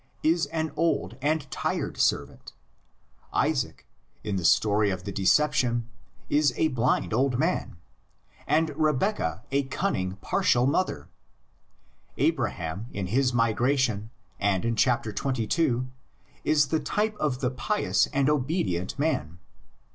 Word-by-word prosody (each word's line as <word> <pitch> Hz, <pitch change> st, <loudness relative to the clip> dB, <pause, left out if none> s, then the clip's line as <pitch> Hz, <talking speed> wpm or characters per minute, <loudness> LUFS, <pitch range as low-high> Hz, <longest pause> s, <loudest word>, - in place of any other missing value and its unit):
is 165 Hz, +2 st, +2 dB
an 160 Hz, -1 st, -2 dB
old 165 Hz, -, 0 dB
and 150 Hz, +2 st, 0 dB
tried -, -, -2 dB
servant; -, -, -1 dB, 0.8 s
Isaac, 65 Hz, -, -1 dB, 0.4 s
in 105 Hz, -2 st, -2 dB
the 95 Hz, -, -2 dB
story 105 Hz, +4 st, +3 dB
of 95 Hz, -2 st, -3 dB
the 100 Hz, -, -5 dB
decep 150 Hz, +11 st, +3 dB
tion, 120 Hz, -3 st, 0 dB, 0.4 s
is 145 Hz, -4 st, +2 dB
a 160 Hz, -, +2 dB
blind 125 Hz, -3 st, 0 dB
old 130 Hz, +1 st, +2 dB
man, 160 Hz, -, -1 dB, 0.7 s
and 160 Hz, +1 st, +2 dB
Rebeccah 150 Hz, -, 0 dB
a 140 Hz, +1 st, +2 dB
cunning, 115 Hz, -, -1 dB
partial 120 Hz, +4 st, +1 dB
mother; 165 Hz, +7 st, 0 dB, 1.1 s
Abraham 85 Hz, +7 st, -1 dB
in 100 Hz, -1 st, -3 dB
his 130 Hz, 0 st, +3 dB
migration 115 Hz, -1 st, +1 dB, 0.3 s
and 100 Hz, 0 st, +1 dB
in 115 Hz, 0 st, 0 dB
chap. 120 Hz, +2 st, +2 dB
xxii. 125 Hz, +3 st, 0 dB, 0.6 s
is 150 Hz, -3 st, +3 dB
the 160 Hz, -, +1 dB
type 210 Hz, +8 st, -1 dB
of 145 Hz, -5 st, 0 dB
the 125 Hz, -1 st, 0 dB
pious 170 Hz, -, +1 dB
and 140 Hz, -1 st, 0 dB
obedient 130 Hz, -, 0 dB
man. 115 Hz, -, -1 dB
130 Hz, 125 wpm, -27 LUFS, 105-150 Hz, 1.1 s, story